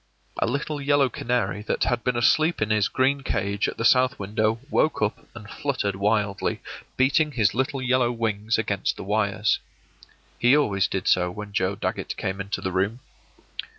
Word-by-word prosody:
A -, -, +1 dB
little 140 Hz, +4 st, -2 dB
yellow 140 Hz, -1 st, +3 dB
canary 110 Hz, -5 st, -1 dB
that 105 Hz, -, -1 dB
had 120 Hz, -1 st, 0 dB
been 125 Hz, -1 st, 0 dB
asleep 155 Hz, +8 st, +3 dB
in 110 Hz, 0 st, 0 dB
his 105 Hz, -3 st, +3 dB
green 135 Hz, +8 st, +1 dB
cage 100 Hz, -4 st, -1 dB
at -, -, -5 dB
the 115 Hz, -, -2 dB
south 130 Hz, +2 st, +4 dB
window 110 Hz, +3 st, 0 dB
woke 155 Hz, -, +2 dB
up 105 Hz, 0 st, -2 dB
and 105 Hz, -3 st, -10 dB
fluttered 115 Hz, -6 st, -2 dB
wildly, 100 Hz, 0 st, 0 dB, 0.4 s
beating 145 Hz, +3 st, +2 dB
his 110 Hz, -6 st, +2 dB
little 130 Hz, +2 st, -1 dB
yellow 125 Hz, -1 st, +2 dB
wings 110 Hz, -2 st, -1 dB
against 100 Hz, -3 st, -1 dB
the -, -, -6 dB
wires. 105 Hz, +1 st, +1 dB, 0.8 s
He 125 Hz, +4 st, +5 dB
always 100 Hz, -9 st, +2 dB
did 95 Hz, -, -3 dB
so 90 Hz, -1 st, +3 dB
when 105 Hz, +2 st, -8 dB
Joe 95 Hz, +1 st, 0 dB
Dagget -, -, -4 dB
came 95 Hz, +1 st, -3 dB
into 100 Hz, +1 st, -4 dB
the 95 Hz, -, -2 dB
room. 100 Hz, +7 st, -1 dB
110 Hz, 175 wpm, -24 LUFS, 100-130 Hz, 0.8 s, He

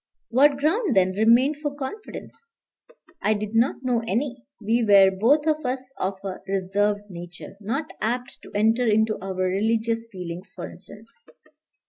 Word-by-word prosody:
What 275 Hz, +4 st, +4 dB
ground, 330 Hz, -, +1 dB
then, 185 Hz, -1 st, +4 dB
remained 235 Hz, +8 st, +4 dB
for 290 Hz, -1 st, -4 dB
confidence? 420 Hz, +9 st, -8 dB, 0.7 s
I 215 Hz, -, +2 dB
did 210 Hz, +1 st, -4 dB
not 235 Hz, +4 st, +2 dB
know 245 Hz, -3 st, +1 dB
any. 245 Hz, +3 st, -2 dB
We 230 Hz, +2 st, +1 dB
were 200 Hz, -3 st, +7 dB
both 245 Hz, +11 st, +3 dB
of 310 Hz, -1 st, +1 dB
us 260 Hz, +1 st, -4 dB
of 190 Hz, +1 st, -1 dB
a 190 Hz, -2 st, -5 dB
reserved 200 Hz, +2 st, 0 dB
nature, 175 Hz, +2 st, -9 dB
not 270 Hz, +10 st, -3 dB
apt 245 Hz, +3 st, -2 dB
to -, -, -13 dB
enter 225 Hz, +4 st, +3 dB
into 220 Hz, 0 st, +2 dB
our 190 Hz, 0 st, -5 dB
religious 220 Hz, +5 st, 0 dB
feelings, 180 Hz, 0 st, -7 dB
for -, -, -6 dB
instance. 225 Hz, -, -13 dB
225 Hz, 150 wpm, -24 LUFS, 195-260 Hz, 0.7 s, were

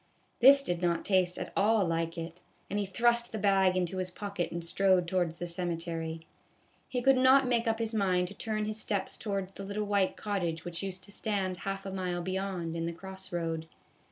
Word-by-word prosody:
This 275 Hz, +3 st, +8 dB
did 175 Hz, -8 st, -2 dB
not 170 Hz, -2 st, 0 dB
taste 185 Hz, -2 st, +2 dB
at -, -, -5 dB
all 210 Hz, 0 st, +3 dB
like 165 Hz, 0 st, -1 dB
it, 165 Hz, +1 st, -6 dB, 0.3 s
and 205 Hz, -, 0 dB
he 200 Hz, -, -1 dB
thrust 235 Hz, +4 st, +2 dB
the 220 Hz, -, -3 dB
bag 195 Hz, -2 st, +3 dB
into 185 Hz, +1 st, -1 dB
his 185 Hz, 0 st, -2 dB
pocket 200 Hz, -1 st, -4 dB
and 170 Hz, 0 st, -4 dB
strode 185 Hz, 0 st, +3 dB
towards 175 Hz, -2 st, 0 dB
the 175 Hz, -, -3 dB
cemetery. 165 Hz, -2 st, -3 dB, 0.7 s
He 250 Hz, -1 st, -2 dB
could 270 Hz, 0 st, +5 dB
not 260 Hz, +1 st, +6 dB
make 235 Hz, -1 st, +1 dB
up 225 Hz, 0 st, +2 dB
his 225 Hz, 0 st, -2 dB
mind 185 Hz, -4 st, +2 dB
to -, -, -9 dB
turn 215 Hz, 0 st, -2 dB
his 215 Hz, +1 st, -3 dB
steps 200 Hz, -3 st, -1 dB
towards 195 Hz, -3 st, -3 dB
the 195 Hz, -, -8 dB
little 205 Hz, +2 st, -3 dB
white 200 Hz, -2 st, +1 dB
cottage 175 Hz, -6 st, -2 dB
which 175 Hz, -1 st, -4 dB
used 190 Hz, -2 st, -4 dB
to 200 Hz, -, -8 dB
stand 195 Hz, -4 st, -1 dB
half 195 Hz, 0 st, -4 dB
a 195 Hz, -, -4 dB
mile 180 Hz, -2 st, -2 dB
beyond, 185 Hz, -3 st, -3 dB
in 165 Hz, 0 st, -2 dB
the 170 Hz, -, -3 dB
cross 190 Hz, +2 st, -8 dB
road. 165 Hz, -2 st, -2 dB
190 Hz, 210 wpm, -30 LUFS, 175-205 Hz, 0.7 s, This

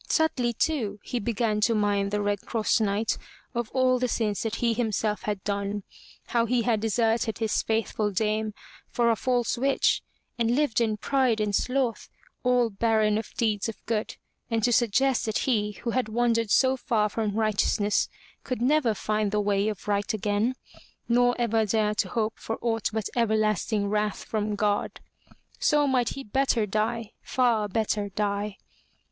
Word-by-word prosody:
Subtly, 255 Hz, -7 st, +1 dB
too, 225 Hz, -7 st, -1 dB
he 245 Hz, -, -3 dB
began 220 Hz, -1 st, 0 dB
to 230 Hz, +1 st, +3 dB
mind 205 Hz, -1 st, +1 dB
the 205 Hz, 0 st, -1 dB
Red 205 Hz, -1 st, 0 dB
Cross 225 Hz, 0 st, +1 dB
Knight 210 Hz, +1 st, 0 dB, 0.3 s
of 235 Hz, -2 st, -2 dB
all 255 Hz, -1 st, +3 dB
the 250 Hz, -, +1 dB
sins 215 Hz, -4 st, -1 dB
that 225 Hz, -1 st, -2 dB
he 235 Hz, -1 st, +1 dB
himself 215 Hz, -2 st, -1 dB
had 205 Hz, -2 st, -3 dB
done, 200 Hz, 0 st, -2 dB, 0.4 s
how 235 Hz, -1 st, +1 dB
he 240 Hz, 0 st, +1 dB
had 230 Hz, -3 st, +1 dB
deserted 225 Hz, 0 st, +1 dB
his 220 Hz, -2 st, 0 dB
faithful 220 Hz, -1 st, -1 dB
dame 215 Hz, +1 st, -1 dB, 0.3 s
for 235 Hz, -1 st, +2 dB
a -, -, +2 dB
false 245 Hz, 0 st, 0 dB
witch, 275 Hz, +1 st, +2 dB, 0.4 s
and 235 Hz, +1 st, +2 dB
lived 285 Hz, -5 st, +1 dB
in 215 Hz, -2 st, +1 dB
pride 255 Hz, -1 st, +1 dB
and 210 Hz, -1 st, 0 dB
sloth, 250 Hz, +2 st, 0 dB, 0.3 s
all 245 Hz, -2 st, +2 dB
barren 215 Hz, 0 st, +2 dB
of 220 Hz, -, -8 dB
deeds 215 Hz, -2 st, 0 dB
of 225 Hz, -, -5 dB
good, 220 Hz, -2 st, -2 dB, 0.3 s
and 225 Hz, -2 st, 0 dB
to 245 Hz, -, +3 dB
suggest 245 Hz, +2 st, +2 dB
that 220 Hz, -, 0 dB
he 210 Hz, -5 st, 0 dB
who 235 Hz, +3 st, -4 dB
had 250 Hz, -3 st, 0 dB
wandered 230 Hz, -1 st, +1 dB
so 260 Hz, +4 st, +4 dB
far 220 Hz, -4 st, +1 dB
from 210 Hz, -1 st, -2 dB
righteousness 210 Hz, -1 st, +1 dB, 0.3 s
could 255 Hz, -3 st, -3 dB
never 250 Hz, -2 st, +2 dB
find 215 Hz, 0 st, 0 dB
the 210 Hz, -, +1 dB
Way 205 Hz, 0 st, +1 dB
of 210 Hz, -2 st, -4 dB
Right 205 Hz, 0 st, 0 dB
again, 210 Hz, +4 st, 0 dB, 0.5 s
nor 245 Hz, +1 st, +3 dB
ever 225 Hz, -2 st, +2 dB
dare 210 Hz, 0 st, +1 dB
to 205 Hz, -2 st, -1 dB
hope 220 Hz, +2 st, -2 dB
for 225 Hz, -, -4 dB
aught 225 Hz, -2 st, 0 dB
but 220 Hz, -2 st, -2 dB
everlasting 215 Hz, -2 st, +1 dB
wrath 210 Hz, 0 st, -1 dB
from 215 Hz, -1 st, -2 dB
God. 205 Hz, 0 st, 0 dB, 0.6 s
So 295 Hz, -1 st, +3 dB
might 255 Hz, -4 st, +2 dB
he 275 Hz, -, -6 dB
better 255 Hz, -1 st, +1 dB
die, 215 Hz, +2 st, -1 dB
far 235 Hz, -5 st, +1 dB
better 210 Hz, 0 st, -1 dB
die. 205 Hz, 0 st, -2 dB
220 Hz, 170 wpm, -26 LUFS, 210-240 Hz, 0.6 s, so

